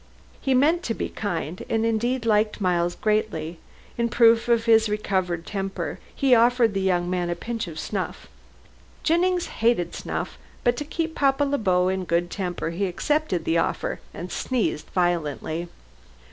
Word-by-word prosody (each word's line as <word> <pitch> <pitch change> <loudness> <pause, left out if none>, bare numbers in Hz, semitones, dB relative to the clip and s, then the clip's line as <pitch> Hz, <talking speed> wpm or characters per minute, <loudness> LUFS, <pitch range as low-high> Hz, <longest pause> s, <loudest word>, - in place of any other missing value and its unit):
He 265 -1 +2
meant 315 +7 +4
to 225 - -1
be - - -3
kind, 175 -4 -4
and 225 0 +1
indeed 230 +2 0
liked 215 -1 +2
Miles 175 -2 +1
greatly. 205 -7 -1 0.4
In 235 0 +2
proof 230 0 +5
of 235 -1 +3
his 225 -1 +5
recovered 185 -5 -1
temper, 195 -1 -4 0.2
he 270 -3 +3
offered 235 -1 +4
the 195 - -1
young 180 -2 +1
man 180 -1 -1
a 175 - -1
pinch 225 +3 -4
of 160 -2 -8
snuff. 190 +2 -4 0.8
Jennings 355 +2 +2 0.2
hated 225 -6 +2
snuff, - - -4 0.2
but 240 0 +3
to 295 - -3
keep 320 +2 -2
Papa 275 -1 +2
Le 285 0 0
Beau 180 -3 +2
in 190 0 0
a - - -5
good 170 +1 0
temper 180 -4 -3
he 195 +4 -1
accepted 190 - 0
the 165 +1 +2
offer - - -1
and 175 +1 -7
sneezed 235 -11 -1
violently. 170 -2 -1
210 Hz, 165 wpm, -24 LUFS, 175-240 Hz, 0.8 s, proof